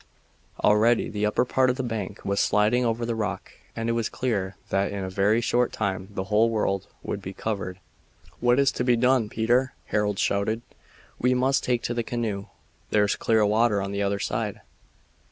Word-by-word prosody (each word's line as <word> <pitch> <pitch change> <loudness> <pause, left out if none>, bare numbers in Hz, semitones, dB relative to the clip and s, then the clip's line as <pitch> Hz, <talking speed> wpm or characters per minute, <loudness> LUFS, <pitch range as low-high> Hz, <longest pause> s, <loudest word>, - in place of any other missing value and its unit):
Already 110 +3 +4
the 105 0 0
upper 105 - +1
part 130 +1 +2
of 125 - +1
the 130 - -3
bank 110 -5 -5
was 100 0 0
sliding 105 +5 +3
over 115 0 0
the 115 - -1
rock, 110 -4 -3 0.2
and 115 0 -3
it - - +2
was 115 -1 0
clear 100 -6 -2
that 95 +1 +1
in 100 -1 -4
a 95 - -4
very 100 +4 +2
short 120 +1 +1
time 95 -3 -2
the 95 -2 -4
whole 105 -1 +1 0.2
would 100 - -4
be 95 0 -7
covered. 95 -3 -4 0.6
"What 120 +1 +3
is 140 -1 +4
to - - -2
be 125 -1 +4
done, 125 -2 +2
Peter?" 120 +4 +1
Harold 105 -1 0
shouted. 110 +5 0 0.6
"We 125 +1 +2
must 130 +1 +2
take 120 -2 0
to 120 - -1
the 120 - -1
canoe. 110 -4 -3 0.4
There's 105 -1 +2
clear 110 -2 +2
water 105 0 +3
on 100 0 -3
the 100 0 -2
other 100 0 0
side." - - -3
110 Hz, 190 wpm, -25 LUFS, 100-120 Hz, 0.6 s, Already